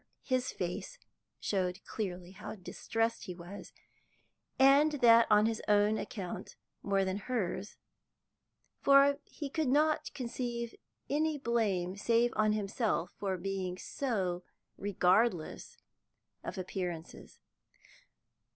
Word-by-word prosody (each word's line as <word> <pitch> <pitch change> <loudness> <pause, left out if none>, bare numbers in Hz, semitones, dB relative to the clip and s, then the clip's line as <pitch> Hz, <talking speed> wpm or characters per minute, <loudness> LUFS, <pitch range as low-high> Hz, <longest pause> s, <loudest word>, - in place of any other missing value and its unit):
His 255 -1 0
face 180 - -4 0.4
showed 185 -1 -1
clearly 180 -4 -4
how 200 +3 -8
distressed 225 +4 -2
he 180 - -6
was, 175 +3 -9 0.9
and 280 +3 +6
that 235 -4 +6
on 210 0 +6
his 225 -1 0
own 210 +1 +4
account 195 -8 -6 0.3
more 195 -1 +1
than 190 +1 -1
hers, 205 -3 -3 1.0
for 280 +1 +6
he 295 - -6
could 310 +1 -1
not 300 +4 +2
conceive 235 -2 -3 0.3
any 305 +1 +1
blame 210 -8 0
save 235 +3 +2
on 215 0 +3
himself 205 -3 -1
for 190 -2 -1
being 185 0 -3
so 190 -7 -2 0.3
regardless 190 -1 +1 0.7
of - - -5
appearances. 180 -3 -5
210 Hz, 105 wpm, -32 LUFS, 185-245 Hz, 1.0 s, and